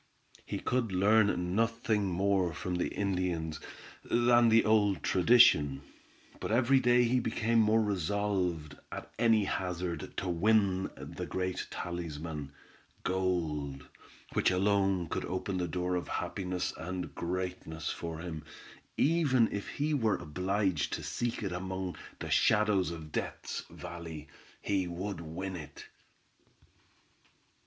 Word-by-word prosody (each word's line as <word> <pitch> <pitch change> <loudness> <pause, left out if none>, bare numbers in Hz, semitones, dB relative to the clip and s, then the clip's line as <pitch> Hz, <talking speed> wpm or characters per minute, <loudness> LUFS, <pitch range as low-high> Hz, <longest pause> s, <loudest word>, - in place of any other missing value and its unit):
He - - -2
could 125 -4 -1
learn 95 -2 +3
nothing 115 -2 +1
more 95 -2 +1
from 90 -1 -3
the 90 - 0
Indians 90 -5 -2 0.4
than 120 0 +4
the 115 +1 +5
old 105 -2 +3
tradition, 90 - +5 0.6
but - - -3
every 130 +3 +4
day 120 -1 +4
he 125 +2 +2
became 115 0 +1
more 110 +1 +4
resolved, 90 -5 -1
at - - -7
any 115 -3 +4
hazard, 90 -4 -3
to 95 - -2
win 95 +1 +2
the - - -6
great 95 0 -2
talisman, 80 -4 -5 0.5
gold, 80 -7 -1 0.5
which - - +3
alone 95 -1 +2
could - - -3
open 95 0 -2
the 90 - -1
door 90 +2 -2
of 90 - -1
happiness 90 -1 -2
and 90 +2 -5
greatness 90 -3 -3
for 85 -1 -5
him; 80 -2 -6 0.5
even 140 -7 +3
if 100 - -4
he 150 +2 -1
were 115 -8 +2
obliged 95 +1 -1
to - - -3
seek 120 -1 -2
it 95 - -2
among 95 0 -4 0.2
the - - -6
shadows 105 -3 +3
in 80 -2 -7
Death's - - -4
Valley, 85 -3 -8 0.4
he 95 -3 0
would 90 +2 -4
win 90 +4 -5
it. 80 -4 -9
95 Hz, 125 wpm, -31 LUFS, 85-110 Hz, 0.6 s, the